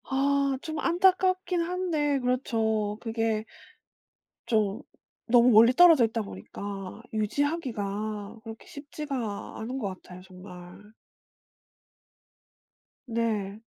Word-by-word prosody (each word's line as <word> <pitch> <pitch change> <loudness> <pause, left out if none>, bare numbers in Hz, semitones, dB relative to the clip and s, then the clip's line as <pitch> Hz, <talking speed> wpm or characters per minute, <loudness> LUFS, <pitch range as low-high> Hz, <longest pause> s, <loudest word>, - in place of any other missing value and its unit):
아 280 +1 +1 0.2
좀 315 -1 -5
안타깝긴 370 +1 +2
한데 335 -5 0
그렇죠. 220 -4 0
그게 225 -2 -1 1.0
좀 215 -3 +1 0.5
너무 240 +1 +6
멀리 230 +3 +7
떨어져 325 -5 +7
있다 225 0 -2
보니까 195 - -8
유지하기가 215 -4 -2
그렇게 225 0 -10
쉽지가 280 -7 -6
않은 245 +4 -4
것 215 - -2 0.2
같아요 180 0 -12
정말. 185 +2 -13 2.2
네. 220 -3 -2
225 Hz, 200 characters per minute, -27 LUFS, 210-285 Hz, 2.2 s, 멀리